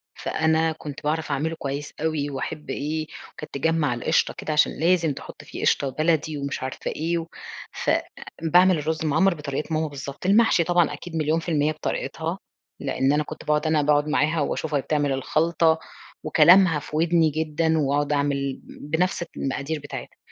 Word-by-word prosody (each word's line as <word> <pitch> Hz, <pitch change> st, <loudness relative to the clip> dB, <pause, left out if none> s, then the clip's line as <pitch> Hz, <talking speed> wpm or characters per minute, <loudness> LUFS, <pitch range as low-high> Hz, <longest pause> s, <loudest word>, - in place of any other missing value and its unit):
فأنا 160 Hz, 0 st, +1 dB
كنت 150 Hz, -3 st, -8 dB
باعرف 155 Hz, 0 st, -1 dB
أعمله 160 Hz, +4 st, -1 dB
كويس 140 Hz, +1 st, -4 dB
أوي 155 Hz, -3 st, -1 dB
واحب 135 Hz, +1 st, -5 dB
إيه، 155 Hz, +3 st, -2 dB, 0.3 s
وكانت 155 Hz, -, -10 dB
تجمع 150 Hz, -1 st, +1 dB
القشطة 120 Hz, -, +1 dB
كده 155 Hz, -, -3 dB
عشان 150 Hz, -, +4 dB
لازم 165 Hz, -3 st, +2 dB
تحط -, -, -10 dB
فيه -, -, -8 dB
قشطة 140 Hz, -, +2 dB
بلدي 155 Hz, +1 st, 0 dB
ومش 140 Hz, -1 st, -4 dB
عارفة 130 Hz, -, -4 dB
إيه، 165 Hz, +1 st, -2 dB, 0.5 s
فباعمل 175 Hz, +2 st, +1 dB
الرز 160 Hz, +1 st, -2 dB
المعمَر 160 Hz, +6 st, +3 dB
بطريقة 150 Hz, +2 st, -4 dB
ماما 155 Hz, 0 st, +1 dB
بالضبط، 140 Hz, +2 st, -8 dB
المحشي 200 Hz, -3 st, +4 dB
طبعًا 175 Hz, 0 st, +2 dB
أكيد 175 Hz, -2 st, -8 dB
مليون 155 Hz, +1 st, +1 dB
في 165 Hz, -, -6 dB
المِيّة 150 Hz, -1 st, +2 dB
بطريقتها، 155 Hz, -, -3 dB, 0.4 s
لأن 135 Hz, +2 st, +1 dB
أنا 150 Hz, 0 st, +2 dB
كنت 155 Hz, -, -9 dB
باقعد 150 Hz, +1 st, +1 dB
أنا 155 Hz, -1 st, +3 dB
باقعد 145 Hz, +1 st, +2 dB
معاها 155 Hz, +2 st, +1 dB
واشوفها 155 Hz, +2 st, -2 dB
وهي 140 Hz, -, +2 dB
بتعمل 145 Hz, -1 st, 0 dB
الخلطة، 160 Hz, +4 st, +2 dB, 0.4 s
وكلامها 165 Hz, +1 st, +6 dB
في 150 Hz, +1 st, -8 dB
ودني 165 Hz, 0 st, +3 dB
جدًا، 160 Hz, +1 st, 0 dB
واقعد 145 Hz, 0 st, +1 dB
أعمل 140 Hz, -1 st, -1 dB
بنفس 170 Hz, +4 st, -2 dB
المقادير 140 Hz, +3 st, -2 dB
بتاعتها، 145 Hz, -, -8 dB
155 Hz, 160 wpm, -24 LUFS, 145-160 Hz, 0.5 s, وكلامها